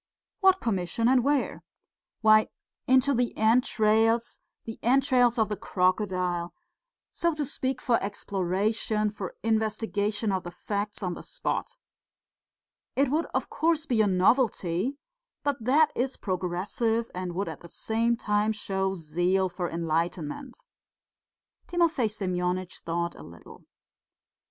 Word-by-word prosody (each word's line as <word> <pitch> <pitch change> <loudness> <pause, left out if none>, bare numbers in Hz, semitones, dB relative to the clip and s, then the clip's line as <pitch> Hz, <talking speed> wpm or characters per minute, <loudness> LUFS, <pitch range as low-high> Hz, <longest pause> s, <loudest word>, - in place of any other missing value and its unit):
"What 380 -2 +4
commission 200 +1 0
and 255 -1 +4
where?" 285 +1 0 0.6
"Why, 215 -1 +6 0.4
into 260 +2 +4
the 245 -1 0
entrails, 225 0 +2 0.3
the 225 - -7
entrails 250 -1 +3
of 220 -2 +3
the 210 - -2
crocodile.... 185 -2 0 0.6
So 340 -2 0
to 300 -1 -2
speak, 260 -1 -2
for 235 -2 +1
exploration, 205 +2 -1
for 200 -3 -6
investigation 215 -1 0
of 190 -1 0
the 175 - -7
facts 205 +4 -4
on 180 -1 -1
the - - -8
spot. - - -3 1.2
It 275 -1 +2
would, 315 +4 0
of - - -1
course, 320 -1 +1
be 240 -7 +2
a 210 - +3
novelty, 195 +2 +2 0.5
but 285 -5 -1
that 295 +6 +4
is 255 +2 -1
progressive 195 +5 -1
and 180 -1 -4
would 195 +2 -1
at - - -6
the 170 - -13
same 230 +4 0
time 210 0 +1
show 190 -2 -2
zeal 175 +3 0
for 175 -1 -3
enlightenment." 165 - -2 1.1
Timofey 330 -9 +2
Semyonitch 185 -2 -2
thought 170 +1 -2
a - - -13
little. 85 -1 -13
215 Hz, 125 wpm, -27 LUFS, 185-245 Hz, 1.2 s, Why